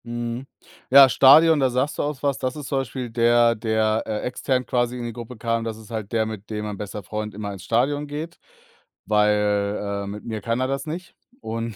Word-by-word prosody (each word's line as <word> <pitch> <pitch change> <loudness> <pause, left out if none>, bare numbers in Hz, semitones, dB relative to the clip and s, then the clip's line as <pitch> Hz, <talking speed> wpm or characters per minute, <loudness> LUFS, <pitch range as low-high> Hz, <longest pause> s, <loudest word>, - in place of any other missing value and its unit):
Mhm. 120 +2 -4 0.4
Ja, 135 0 +9
Stadion, 150 +6 +7
da 135 -2 +3
sagst 130 +4 -1
du - - +1
auch 145 -2 -4
was. 140 -2 0
Das 130 -1 -2
ist 150 -3 -7
zum 135 - 0
Beispiel 130 -1 -5
der, 120 0 +4
der, 110 0 0
äh, 105 -1 -2
extern 125 0 -1
quasi 120 -1 0
in 120 - -5
die 120 -1 -5
Gruppe 120 +1 -9
kam. 115 +1 -1
Das 115 -1 -4
ist 110 +1 -14
halt 110 -3 -5
der, 110 -2 +1
mit 110 -2 -7
dem 105 -1 -4
mein 105 -1 -5
bester 105 0 -6
Freund 105 +2 -5
immer 100 -1 -5
ins 95 -1 -10
Stadion 140 +8 0
geht, 150 +3 -6 0.7
weil, 105 -1 +2 0.3
äh, - - -7
mit 105 +1 -7
mir 110 -2 -4
kann 115 +3 -1
er 130 - 0
das 135 +2 -3
nicht, 170 +3 -6 0.3
und 115 - -4
115 Hz, 220 wpm, -23 LUFS, 110-130 Hz, 0.7 s, Ja